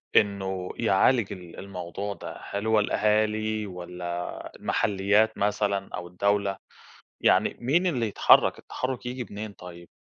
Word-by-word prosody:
إنّه 95 -2 +1
يعالج 115 +1 +3
ال 90 -3 -10
الموضوع 100 +1 -5
ده، - - -8
هل 100 +2 -2
هو 110 -1 +4
الأهالي 110 +1 +1
والّا 90 -1 -6
المحليات 105 +2 +2
مثلًا 100 -1 0
أو 90 - -6
الدولة، 100 +2 0 0.6
يعني - - +3
مين 160 +10 +2
اللي 125 -9 +1
يتحرك، 100 - +5
التحرّك 130 -1 -4
ييجي 125 -1 -4
منين 105 +1 -6
طيّب؟ 85 -2 -11
100 Hz, 125 wpm, -27 LUFS, 95-110 Hz, 0.6 s, يتحرك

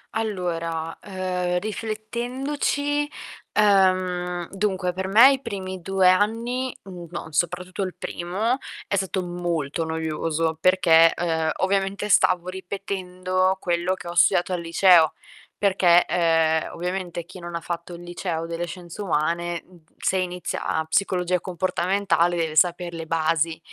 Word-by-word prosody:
Allora, 170 -6 -2
uhm, 185 -2 -2
riflettendoci, 255 +8 -2 0.4
ehm, 185 -3 +2
dunque 190 -2 -1
per 190 +1 -3
me 230 +8 +8
i 270 - -1
primi 190 -6 -5
2 190 +1 +2
anni, 230 +7 +1
mhmm, 180 -3 -9
no, 170 0 -6
soprattutto 180 +4 -1
il 185 -2 -3
primo, 205 +9 -2 0.3
è - - 0
stato 190 -1 -1
molto 170 -3 -2
noioso 160 0 -1
perché, 165 -3 +6
uhm, 160 -2 0
ovviamente 195 +2 0
stavo 180 -2 +3
ripetendo 185 0 -2
quello 175 +1 0
che 175 - -10
ho 170 - -5
studiato 175 +1 +3
al 175 - -2
liceo, 170 -1 +5 0.4
perché, 185 -3 +4
ehm, 165 -2 +2
ovviamente 180 -1 -4
chi 185 - -12
non 175 -1 -7
ha 170 - -3
fatto 170 +1 -5
il 175 - -11
Liceo 175 -1 -4
delle 170 +1 -3
Scienze 175 +3 -8
Umane, 170 0 -1
mhmm, 180 - -19 0.2
se 190 - 0
inizia 180 -3 -2
psicologia 180 0 +1
comportamentale 180 -1 0
deve 160 -2 -1
saper 175 +2 +2
le 165 -1 -6
basi. 165 0 0
180 Hz, 130 wpm, -24 LUFS, 170-195 Hz, 0.4 s, me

